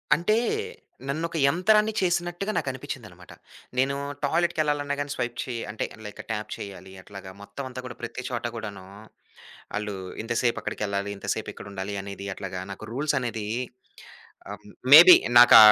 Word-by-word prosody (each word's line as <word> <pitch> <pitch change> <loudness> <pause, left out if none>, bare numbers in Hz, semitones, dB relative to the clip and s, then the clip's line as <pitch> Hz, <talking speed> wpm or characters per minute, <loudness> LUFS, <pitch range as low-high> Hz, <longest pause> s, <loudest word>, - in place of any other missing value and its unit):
అంటే 175 +7 +1 0.7
నన్నొక 165 +3 -2
యంత్రాన్ని 210 +7 +3
చేసినట్టుగా 175 +2 0
నాకు - - -1
అనిపించింది 130 - -7
అన్నమాట. - - -15 0.4
నేను 135 +2 +2 0.3
టాయిలెట్‌కెళ్లాలన్నా 150 -2 +1
గానీ 145 0 -3
స్వైప్ 120 -2 -3
చేయాలి. 120 -2 -4
అంటే 110 - -3 0.2
లైక్ 105 - -8
ట్యాప్ 105 -1 -4
చేయాలి, 95 -1 -9
అట్లాగా 95 -1 -10
మొత్తం 100 +7 -8
అంతా 130 0 -8
కూడా 120 - -7
ప్రతి 120 +2 -6
చోట 120 -2 -3
కూడాను, 100 -4 -7 0.9
ఆళ్లు 105 -1 -3 0.3
ఇంతసేపక్కడికెళ్లాలి, 105 -4 -1
ఇంతసేపిక్కడుండాలి 100 0 -5
అనేది 100 0 -7
అట్లాగా 95 -2 -5
నాకు 110 - -10
రూల్సనేది 125 -6 -1 1.0
ఆహ్, - - -9 0.3
మేబీ 175 +5 +12 0.2
నాకా 120 - +10
120 Hz, 125 wpm, -26 LUFS, 105-155 Hz, 1.0 s, మేబీ